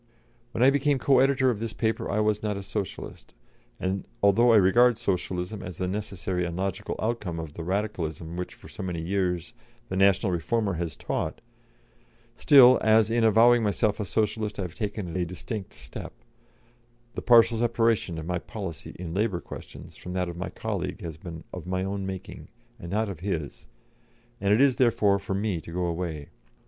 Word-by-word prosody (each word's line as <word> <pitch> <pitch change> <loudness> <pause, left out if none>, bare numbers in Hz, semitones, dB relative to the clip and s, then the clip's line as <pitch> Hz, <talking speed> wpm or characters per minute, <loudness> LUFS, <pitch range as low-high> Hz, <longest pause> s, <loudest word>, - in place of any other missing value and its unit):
"When 120 - 0
I 135 - +7
became 145 0 +2
co 135 0 +4
editor 135 -1 +4
of 110 - -4
this 115 0 -4
paper 110 -1 -1
I 105 +2 +1
was 105 0 +1
not 105 -2 -2
a 100 - -6
Socialist; 100 - -6 0.4
and, 95 +1 -2 0.2
although 115 +5 +5
I - - +6
regard 115 +4 +5
Socialism 95 -2 -2
as 90 -3 -7
the 90 - -1
necessary 95 -2 -3
and 85 0 -4
logical 95 -1 -3
outcome 105 -7 -2
of 80 -2 -6
the 85 - -6
Radicalism 85 -4 -3
which 90 0 -5
for - - -15
so - - -9
many 90 -3 -3
years 90 +2 -1 0.4
the - - -3
National 95 0 +3
Reformer 100 +4 0
has 85 -2 -3
taught, - - -3 1.0
still, 130 -2 +7
as 110 0 +4
in 115 0 +2
avowing 115 +2 +6
myself 105 0 +1
a 105 - -1
Socialist 110 +1 -1
I 100 - -2
have 90 -3 -6
taken 100 -4 -4
a 90 - +1
distinct 95 +4 -6
step, - - -8 1.0
the - - -4
partial 115 -1 +5
separation 115 -6 +1
of 80 - -5
my 90 +1 -1
policy 95 -4 -7
in 85 -2 -6
labour 100 -2 0
questions - - -10
from 90 - -7
that 90 -1 -1
of 85 - -6
my 90 +2 -4
colleague - - -4
has 80 -2 -6
been 80 0 -9
of 90 -1 -7
my 95 0 -1
own 95 0 -3
making, 95 -1 -7 0.3
and 85 - -8
not 110 +4 0
of 95 -5 -6
his, 85 -6 -4 0.7
and 100 -1 +1
it 105 +5 +5
is, 140 -3 +4
therefore, 105 -5 +3
for 95 - -3
me 100 -4 -1
to 85 - -11
go 90 +1 -1
away. 85 -4 -4
100 Hz, 185 wpm, -27 LUFS, 90-110 Hz, 1.0 s, I